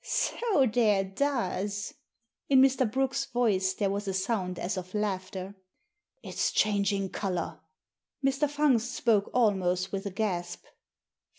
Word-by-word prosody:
" - - -37
So 420 - +1
there 215 -4 +3
does." 205 -2 -2 0.6
In 270 -1 +6
Mr. 260 -3 +4
Brooke's 265 +2 0
voice 195 -6 +1
there 200 -1 0
was 200 +1 -3
a 190 - -1
sound 190 -2 -1
as 190 +4 -2
of 185 +1 -6
laughter. 190 -2 -3 0.7
It's - - -1
changing 200 -2 +1
colour." 185 -4 -3 0.7
Mr. 275 +2 +2
Fungst 270 -5 +1
spoke 215 -4 +2
almost 190 -5 +1
with 195 +1 -3
a - - -2
gasp. 180 -3 -3
205 Hz, 130 wpm, -29 LUFS, 190-245 Hz, 0.7 s, In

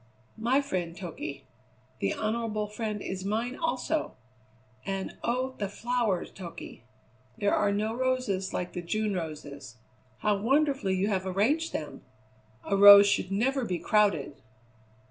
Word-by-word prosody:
"My 250 +5 +2
friend, 180 -10 -3
Toky. 150 -6 -6 0.6
The 100 - 0
honourable 215 -1 -2
friend 210 0 -4
is 190 0 -4
mine, 225 +6 -2
also! 320 -1 -2 0.7
And, 195 -1 -4
oh! 255 +2 -1
the 200 -2 -2
flowers, 230 -3 -1
Toky! 175 -10 -9 0.6
There 205 -1 +1
are 205 -1 +2
no 215 +2 -1
roses 255 -7 -1
like 180 - -4
the 175 - -4
June 210 +4 -1
roses. 145 -7 -6 0.4
How 210 -1 +2
wonderfully 270 -3 +1
you 195 +3 0
have 190 -2 -1
arranged 255 - +1
them! 150 -2 -5 0.6
A 200 - 0
rose 200 0 +10
should 200 - 0
never 260 +7 +1
be 185 -6 -2
crowded." 200 -7 +1
205 Hz, 135 wpm, -28 LUFS, 185-235 Hz, 0.7 s, rose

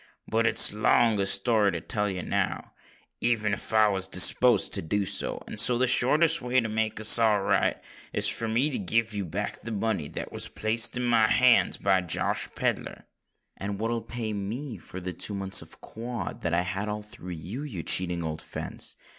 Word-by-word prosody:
But 115 +1 +1
it's - - +5
too 105 - -7
long 115 -2 +3
a 100 - 0
story 100 +1 +3
to 85 - -3
tell 105 +5 -2
you 90 -2 -5
now—even 110 -4 -3
if - - -5
I 110 -1 +4
was 95 -2 -1
disposed 105 +2 +4
to - - -2
do 100 +5 -1
so; - - -3
and 105 - -5
so 120 +2 +5
the 130 - +2
shortest 155 +7 +3
way 125 +1 +1
to 115 - -2
make 110 0 -2
us 110 +2 +5
all 110 -3 +3
right, - - +1 0.3
is - - 0
for 115 - -2
me 125 +7 0
to - - -3
give 110 +3 0
you 100 -1 -3
back 80 - -5
the - - -8
money 105 -7 -2
that - - -7
was - - -5
placed 110 +3 +1
in 125 - -2
my 115 -2 +3
hands 120 +3 +4
by 95 -1 +2
Josh 90 - 0
Pedler." - - -3 0.5
"And 100 0 -5
what'll 115 +1 -2
pay 115 -1 -5
me 110 +4 -5
for 95 - -9
the 90 0 -5
two 100 +5 -1
months 95 0 +2
of - - -15
quod 120 +1 -6
that 85 - -2
I 85 - +2
had 95 +3 -3
all 105 0 -4
through 90 -4 -9
you, 90 - -7
you 110 - -6
cheating 90 -2 +2
old 80 -1 -4
fence?" - - -5
105 Hz, 205 wpm, -27 LUFS, 95-115 Hz, 0.5 s, it's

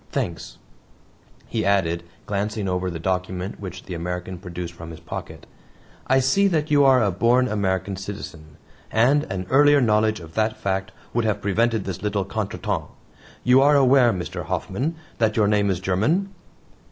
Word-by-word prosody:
Thanks," - - -4 0.9
he - - -2
added, 90 -4 +1 0.2
glancing 105 0 -2
over 90 0 -1
the 85 - -5
document 90 +2 -3
which 95 -2 -7
the 90 - -7
American 90 +1 -4
produced 90 -2 -6
from 85 0 -10
his 80 - -9
pocket. - - -8 0.6
"I 130 +1 +4
see 135 +10 +3
that 155 -4 0
you 145 -1 +5
are 130 -3 +5
a 100 - +2
born 120 +7 +3
American 100 -3 -1
citizen 85 -6 -8 0.3
and 130 +6 +3
an 95 -1 -4
earlier 145 +2 +6
knowledge 110 -3 +2
of 80 -1 -12
that 110 +2 0
fact 95 0 -2 0.2
would 120 -1 +1
have 105 -2 0
prevented 110 +2 +1
this 95 -3 -5
little 100 -1 -1
contretemps. 100 -5 -3 0.5
You 125 +2 +5
are 145 +1 +5
aware, 130 -2 +5
Mr. 90 -2 -5
Hoffman, 95 - -2 0.2
that 110 -1 +1
your 105 -2 +4
name 105 -1 +2
is 95 -2 0
German?" 115 - 0
100 Hz, 165 wpm, -23 LUFS, 90-120 Hz, 0.9 s, earlier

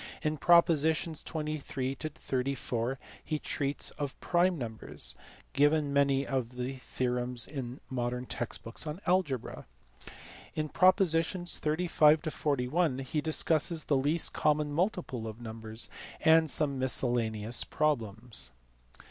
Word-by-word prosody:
In 155 0 -1
propositions 160 0 +3
23 150 -4 -4
to 155 +3 -5
34 130 -3 -3 0.3
he 155 - -2
treats 145 -1 -2
of 140 -3 -6
prime 175 0 +1
numbers, 110 - 0 0.4
giving 145 0 +2
many 140 -1 +2
of 130 -3 -3
the 125 +2 -4
theorems 125 -1 -2
in 130 -3 -6
modern 125 -1 -3
text 120 -1 -5
books 115 +7 -4
on 150 +4 -5
algebra. 175 -9 -1 0.9
In 155 -1 -2
propositions 175 -1 +2
35 155 -1 +3
to 155 - -3
41 145 +1 0
he 135 +3 -3
discusses 160 +1 +2
the 145 - +1
least 145 +5 +1
common 150 -1 +1
multiple 165 - -2
of 110 +1 -8
numbers, 110 -1 -2 0.3
and 160 0 +5
some 140 -3 +1
miscellaneous 120 -3 +3
problems. 110 - -1
140 Hz, 120 wpm, -30 LUFS, 125-155 Hz, 0.9 s, and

